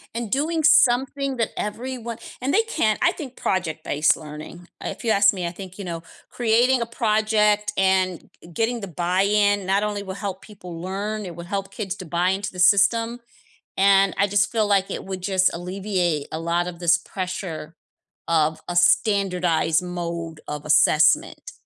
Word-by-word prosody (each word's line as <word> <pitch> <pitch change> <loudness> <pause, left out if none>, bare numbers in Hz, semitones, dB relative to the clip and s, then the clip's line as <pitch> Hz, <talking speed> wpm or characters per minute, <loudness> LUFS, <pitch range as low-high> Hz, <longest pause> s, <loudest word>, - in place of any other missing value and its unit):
And 230 -2 -3
doing 310 +6 0
something 270 -1 +3
that 230 -2 0
everyone 235 +1 -5 0.2
and 265 +3 -2
they 440 - +5
can't 220 - 0
I 350 0 +3
think 265 -6 -8
project-based 160 -4 0
learning, 155 +3 -10 0.2
uh, - - -3
if - - -8
you 235 - -1
ask 200 -1 +5
me, 180 -3 -3
I - - -4
think, 185 +1 -10
you 200 - -5
know, 165 -2 -5 0.3
creating 240 +2 +2
a - - 0
project 215 -2 +1
and 190 -2 +1
g - - -14
getting 230 +4 -1
the 200 - -5
buy-in 195 +4 +1
not 195 +2 +2
only 205 -1 -2
will 190 -1 -6
help 200 -1 -6
people 180 -5 -10
learn, 200 +4 -4
it 175 -2 -8
will 170 +1 -8
help 195 +1 -4
kids 200 -3 -4
to 185 - -8
buy 175 +2 0
into 200 +2 -2
the 180 - -10
system, 230 +6 +3 0.6
and 195 0 +4
I 200 - +3
just 205 +1 +1
feel 220 -2 +1
like 195 -1 +2
it - - -5
would 190 -1 -6
just 190 0 +2
alleviate 180 -3 -2
a 160 - -4
lot 170 +1 -1
of 175 -1 -7
this 170 -1 +4
pressure 180 -3 -6 0.5
of 160 -1 +1
a 175 - -4
standardized 180 -4 +2
mode 170 -2 -5
of 150 0 -6
assessment. 155 - +3
195 Hz, 175 wpm, -23 LUFS, 175-215 Hz, 0.6 s, they